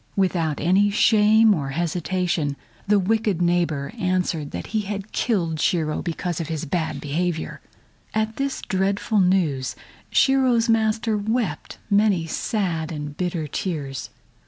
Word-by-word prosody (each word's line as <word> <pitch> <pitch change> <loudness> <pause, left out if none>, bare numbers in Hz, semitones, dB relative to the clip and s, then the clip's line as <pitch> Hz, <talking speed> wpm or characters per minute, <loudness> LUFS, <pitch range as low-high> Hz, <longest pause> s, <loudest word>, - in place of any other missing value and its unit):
Without 170 -6 0
any 190 +5 +3
shame 215 +1 +5
or 145 -7 -2
hesitation, 170 -1 -1 0.3
the 210 0 +4
wicked 210 -1 +1
neighbor 170 -3 0
answered 180 -5 0
that 85 - -6
he 215 - +2
had 205 0 -5
killed 170 -9 0
Shiro 160 -2 0
because 175 -1 -3
of 160 - -4
his 160 -2 -3
bad 160 +2 -2
behavior. 160 +3 -2 0.5
At 220 0 -1
this 275 0 -2
dreadful 200 +2 0
news 175 -8 +1 0.3
Shiro's 255 -4 +3
master 220 0 +2
wept 210 -5 -2
many 200 -4 +3
sad 165 -2 -2
and 150 -2 -5
bitter 175 -2 -2
tears. 145 -4 -4
180 Hz, 130 wpm, -23 LUFS, 160-210 Hz, 0.5 s, shame